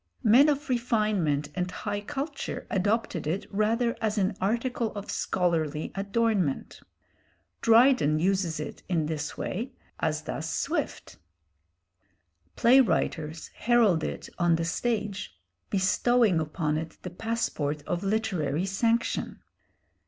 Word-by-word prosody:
Men 255 +7 +6
of 290 +1 -1
refinement 210 - +1
and 180 0 -2
high 205 +2 -4
culture 285 +5 -4
adopted 200 -4 0
it 180 +6 -1
rather 225 +3 +1
as 215 -1 0
an 195 0 +1
article 230 +3 0
of 205 -1 -5
scholarly 160 -4 0
adornment. 200 - 0 0.8
Dryden 230 - +5
uses 175 -2 0
it 150 - -6
in 165 -4 +1
this 150 -1 -4
way, 240 +7 -4 0.3
as 155 -1 -1
does - - -4
Swift. - - -3 1.4
Play 245 +3 +6
writers 160 -8 -1
heralded 225 -9 +3
it - - -8
on 175 -1 +4
the 165 0 -1
stage, 205 - -2 0.3
bestowing 200 0 +3
upon 155 0 -1
it 160 0 -7
the 180 - -5
passport 175 -8 -2
of 175 - -2
literary 185 -7 0
sanction. 230 +4 0
195 Hz, 115 wpm, -28 LUFS, 160-230 Hz, 1.4 s, Men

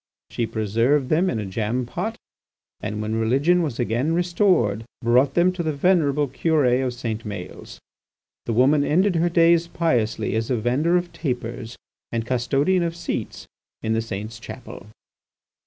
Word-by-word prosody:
She 115 - -1
preserved 115 +5 +1
them 175 +4 +2
in 115 - -2
a 105 - -3
jam 110 +5 -2
pot, 205 - -4 0.6
and 105 0 -4
when 110 +1 -2
religion 140 +11 +3
was 145 -8 -3
again 120 +7 0
restored, 175 - +2 0.2
brought 125 +4 +3
them 175 +1 +4
to 180 -1 -4
the 160 -2 -1
venerable 150 -2 +2
Curé 135 -2 +2
of 125 -2 -2
St. 115 -2 -4
Maëls. 105 -4 -8 0.7
The 115 - 0
woman 140 +5 +4
ended 180 +5 +2
her 170 +2 +2
days 170 0 +4
piously 125 -11 0
as 110 0 -1
a 130 - +2
vendor 135 +10 +2
of 175 -1 -4
tapers 120 -4 -4 0.3
and 115 -1 -2
custodian 135 +9 +1
of 170 -1 -2
seats 170 - -5 0.4
in 110 0 0
the 115 - +1
saint's 110 +1 -6
chapel." 105 -3 -10
130 Hz, 155 wpm, -23 LUFS, 115-170 Hz, 0.7 s, them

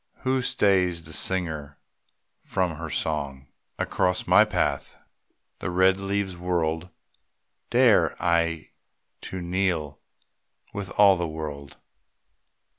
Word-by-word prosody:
Who 130 0 +1
stays 90 -8 +1
the 80 - -8
singer 80 -7 -2 0.6
from 90 -4 -1
her 80 0 -6
song? 70 -4 -3 0.3
Across 90 -2 0
my 90 +4 +6
path 90 -9 -1 0.6
the - - -3
red 95 +1 +3
leaves 100 -1 -2
whirled. 85 -1 -1 0.8
Dared - - +4
I 85 -2 0 0.5
to 95 -1 -6
kneel 85 -5 -1 0.7
with 100 -2 -5
all 100 -2 +7
the 85 -1 -2
world? 75 -3 -7
90 Hz, 105 wpm, -25 LUFS, 80-95 Hz, 0.8 s, all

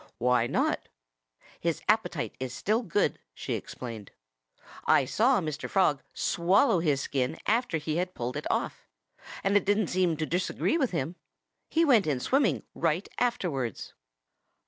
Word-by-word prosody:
"Why 120 -1 +2
not?" - - 0 0.7
"His 170 -1 -1
appetite 215 -8 +1
is 130 -1 -4
still 220 +4 +1
good," 205 -2 0 0.2
she - - -4
explained. 115 -5 -6 0.8
"I 135 - +5
saw 225 - +3
Mr. 155 -4 -4
Frog 150 -8 +2
swallow 185 +4 +3
his 150 -5 +1
skin 130 -2 -1
after 225 -5 +1
he 155 +1 -2
had 180 +1 -2
pulled 125 +1 -3
it - - -4
off. - - -2 0.6
And 195 +1 +2
it 205 - +5
didn't 205 0 +1
seem 180 -3 +2
to 155 - -1
disagree 180 - 0
with 265 -5 +2
him. 165 +1 -3 0.5
He 330 +1 +3
went 235 - +4
in 140 -4 +1
swimming 250 - +1
right 170 +6 0
afterwards." 150 - -2
170 Hz, 145 wpm, -28 LUFS, 135-205 Hz, 0.8 s, I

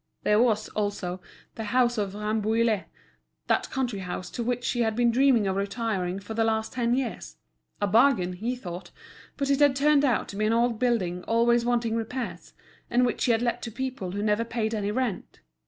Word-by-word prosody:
There 210 +1 +4
was, 220 -3 +2
also, 200 -3 -3 0.3
the 225 - -5
house 240 +1 +2
at 200 -1 -2
Rambouillet, 215 -1 0 0.6
that - - +1
country 250 -6 -2
house 180 0 -5
to 240 - -4
which 245 +1 -1
he 240 - -2
had 220 -2 +1
been 240 0 +3
dreaming 250 -3 +4
of 190 -1 0
retiring 200 -3 -2
for 205 +3 -7
the 225 0 +1
last 220 0 0
ten 240 -1 +1
years—a 250 -4 -6
bargain, 210 -3 +3
he 225 +8 -3
thought; 180 -7 -8 0.5
but 280 -1 0
it 275 - +2
had 285 -2 +5
turned 290 +1 +4
out 255 -5 +1
to - - -7
be 215 +1 0
an 220 - +2
old 235 -1 +1
building 200 -8 0
always 235 +1 +3
wanting 235 -2 +1
repairs, 230 +2 -5 0.4
and 245 +1 +3
which 240 - 0
he 245 - +3
had 225 +1 +2
let 235 - -1
to 230 - -5
people 255 -7 -4
who 205 +1 -2
never 210 +1 +2
paid 230 -1 -2
any 205 -2 -1
rent. 230 -2 -3
230 Hz, 195 wpm, -26 LUFS, 205-245 Hz, 0.6 s, had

